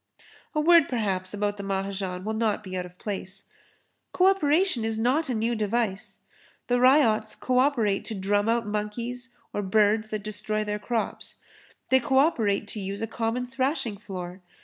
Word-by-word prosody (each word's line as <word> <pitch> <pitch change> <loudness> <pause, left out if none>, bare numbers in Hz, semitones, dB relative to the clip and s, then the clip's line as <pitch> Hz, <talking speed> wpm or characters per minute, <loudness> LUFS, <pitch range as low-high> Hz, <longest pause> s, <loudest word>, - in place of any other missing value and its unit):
A - - +2
word 335 0 +6
perhaps 195 -6 -1
about 205 0 -2
the 200 - -6
Mahajan 195 -1 -3
will 220 - -1
not 220 -1 0
be 185 -2 -6
out 180 -1 -3
of 180 0 -19
place. 195 -1 -5 0.7
Co 365 - +3
operation 360 - +3
is 225 0 -1
not 265 +7 +1
a 250 - 0
new 225 +2 0
device. 210 -2 -1 0.5
The 245 0 +1
ryots 240 -5 +4
co 255 0 +1
operate 235 -8 +2
to 220 - -5
drum 205 +2 +1
out 230 0 +1
monkeys 230 +4 -4 0.2
or 205 - -1
birds 210 +2 +2
that 215 -1 -4
destroy 215 +1 -2
their 210 0 -3
crops. 225 +1 -3 0.5
They 260 - +5
co 260 +2 +1
operate 225 -9 +2
to 215 - -3
use 200 +2 -4
a - - +2
common 230 +2 -2
thrashing 260 -3 -1
floor. 185 -2 -7
215 Hz, 170 wpm, -26 LUFS, 200-245 Hz, 0.7 s, word